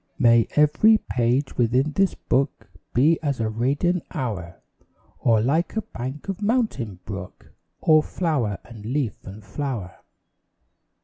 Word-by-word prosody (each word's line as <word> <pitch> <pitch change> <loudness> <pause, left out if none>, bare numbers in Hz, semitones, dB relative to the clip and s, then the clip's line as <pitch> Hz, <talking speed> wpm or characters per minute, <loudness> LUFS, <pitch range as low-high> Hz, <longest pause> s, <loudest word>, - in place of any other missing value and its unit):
May 115 -3 +5
every 150 +9 +5
page 125 - -1
within 125 +5 +2
this 195 +4 +1
book 135 -7 -1 0.2
Be 150 +7 +3
as 140 -5 -1
a 110 -1 0
radiant 140 +10 0
hour; 95 -10 -5 0.6
Or 115 -3 +3
like 155 - 0
a 220 - -1
bank 130 +7 -7
of 195 +1 -4
mountain 205 - 0
brook, 100 -3 -8 0.3
All 155 -1 +5
flower 150 - -1
and 115 -3 -12
leaf 125 -1 -1
and 100 +2 -10
flower. 105 -3 -5
130 Hz, 130 wpm, -24 LUFS, 115-155 Hz, 0.6 s, May